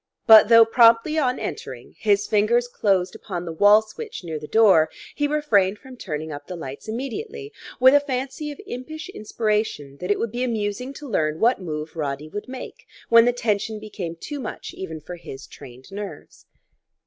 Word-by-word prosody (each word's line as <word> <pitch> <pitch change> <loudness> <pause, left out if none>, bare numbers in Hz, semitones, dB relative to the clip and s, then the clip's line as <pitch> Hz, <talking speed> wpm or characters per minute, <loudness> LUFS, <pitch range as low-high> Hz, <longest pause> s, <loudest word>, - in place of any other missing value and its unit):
But 220 -1 +9
though 230 -1 +8
promptly 230 +6 +4
on 255 -3 +1
entering 125 -2 -7
his 205 -1 +2
fingers 220 +4 +2
closed 195 -6 0
upon 185 -5 -6
the 170 - -5
wall 205 +5 +6
switch 410 - -9
near 160 -3 -5
the 150 - -9
door, 195 -8 +5 0.2
he 290 - 0
refrained 215 -10 +2
from 260 +4 -13
turning 155 -8 -5
up 145 0 -8
the 180 - -6
lights 140 +1 -8
immediately, 415 - -5 0.3
with 260 +2 +7
a 290 - +7
fancy 275 +2 -4
of 290 - -11
impish 310 +3 -7
inspiration 210 - -2
that 180 +4 -6
it 205 - +2
would 230 - -2
be 245 +2 -2
amusing 230 +1 -2
to 290 +1 -9
learn 155 - -1
what 235 -2 +3
move 155 -2 -5
Roddy 145 -1 -3
would 205 +6 -6
make 265 - -9 0.2
when 230 0 +7
the 245 - +4
tension 220 -2 -1
became 200 -6 -6
too 290 - -7
much 250 - -7
even 160 -4 -7
for 175 +4 -8
his 135 -5 -10
trained 130 +6 -14
nerves. 200 0 -9
215 Hz, 185 wpm, -23 LUFS, 175-250 Hz, 0.3 s, But